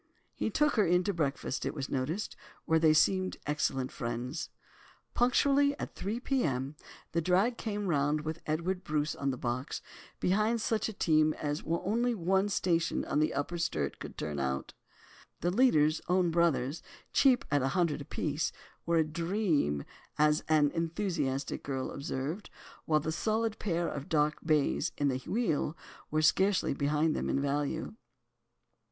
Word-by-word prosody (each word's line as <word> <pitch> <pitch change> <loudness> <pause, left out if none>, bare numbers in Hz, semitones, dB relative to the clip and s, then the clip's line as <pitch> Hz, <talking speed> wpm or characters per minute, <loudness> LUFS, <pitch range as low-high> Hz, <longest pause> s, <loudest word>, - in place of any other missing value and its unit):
He - - -2
took 295 +4 +2
her 215 - +6
in 180 +1 +3
to 200 - 0
breakfast, 140 -5 -2
it - - -3
was 140 -2 -3
noticed, 150 +10 -2 0.3
where 160 0 +3
they 160 -1 +5
seemed 185 +4 +3
excellent 135 -3 -1
friends. 120 +5 -4 0.6
Punctually 280 +3 +3
at - - -5
three 210 +5 -3
p.m. 145 - -1 0.4
the 170 - +1
drag 190 +8 +2
came 210 -3 -3
round 150 -3 +1
with 155 +2 -5
Edward 175 +4 -1
Bruce 150 -3 0
on 140 - -2
the 130 - -2
box—behind 180 - -2
such 225 0 0
a - - -6
team 155 -4 +3
as 145 0 -2
only 225 +9 0
one 190 +2 +1
station 170 -4 +1
on - - 0
the 155 - +2
Upper 170 +5 -2
Sturt 75 - -1
could - - -8
turn 75 -2 -3
out. 65 0 -2 0.7
The 175 - +1
leaders—own 180 - +3
brothers—cheap 170 - +1
at 145 -1 +3
a 130 - +1
hundred 170 -5 +1
apiece, 150 +2 -2 0.4
were 170 0 +3
a 160 - +5
"dream," 165 - 0 0.3
as 150 0 +3
an 150 -2 +4
enthusiastic 165 -5 -2
girl 135 -2 -3
observed, 140 +7 -4 0.4
while 155 -1 +3
the 160 - -2
solid 220 +5 -1
pair 170 -4 0
of 140 0 -5
dark 150 -1 +2
bays 155 +1 +1
in 145 -1 +2
the 130 -1 -1
wheel 165 - -1 0.3
were 155 +1 +1
scarcely 190 +4 +3
behind 150 +3 +1
them - - -2
in - - +1
value. 145 +6 -1
160 Hz, 150 wpm, -31 LUFS, 145-190 Hz, 0.7 s, her